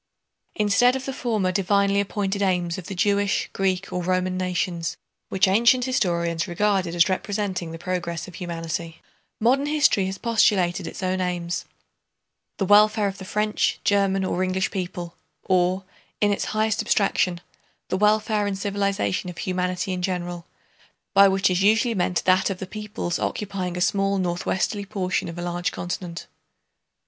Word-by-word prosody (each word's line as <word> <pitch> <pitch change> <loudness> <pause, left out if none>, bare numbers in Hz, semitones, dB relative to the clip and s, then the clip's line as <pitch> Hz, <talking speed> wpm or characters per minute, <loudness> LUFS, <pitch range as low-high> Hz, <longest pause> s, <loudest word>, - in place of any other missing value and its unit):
Instead 215 +5 +3
of 265 0 -4
the 270 - -3
former 220 -8 0
divinely 200 +1 +2
appointed 200 0 -1
aims 180 -3 0
of 180 - -10
the 195 - -5
Jewish, 200 +2 +1
Greek, 195 0 -1
or 180 - -1
Roman 185 +1 0
nations, 180 -2 -2 0.3
which 190 +1 +3
ancient 235 +5 +4
historians 170 -8 0
regarded 185 -1 0
as 170 +2 +5
representing 190 -3 -2
the 165 - -6
progress 175 -1 -3
of 185 - -11
humanity, 165 -2 -5 0.4
modern 265 +6 +2
history 290 -10 +3
has 190 0 -4
postulated 190 -6 +2
its - - -7
own 185 0 0
aims—the 175 +2 -6
welfare 210 +1 +5
of 195 0 -5
the 190 - -8
French, 210 +2 0
German, 195 -1 +2
or 185 - -1
English 185 -2 0
people, 175 -2 -5 0.3
or, 185 +1 +1 0.4
in 205 -1 +3
its - - -2
highest 215 0 0
abstraction, 195 -4 +1 0.5
the 185 - 0
welfare 210 0 +2
and 195 -1 -2
civilization 195 - -1
of 175 - -9
humanity 180 0 -2
in 180 - -3
general, 175 -2 -3 0.7
by 200 0 +8
which 190 0 +2
is 180 +1 +1
usually 220 +4 +3
meant 180 -3 0
that 185 +1 +4
of 195 - -3
the 190 - -5
peoples 210 -3 -4
occupying 185 -4 -3
a - - -2
small 195 +1 +2
northwesterly 185 +3 -1
portion 190 -2 -2
of 165 - -8
a 175 - -4
large 175 0 -2
continent. 175 -1 -5
190 Hz, 155 wpm, -24 LUFS, 180-205 Hz, 0.7 s, by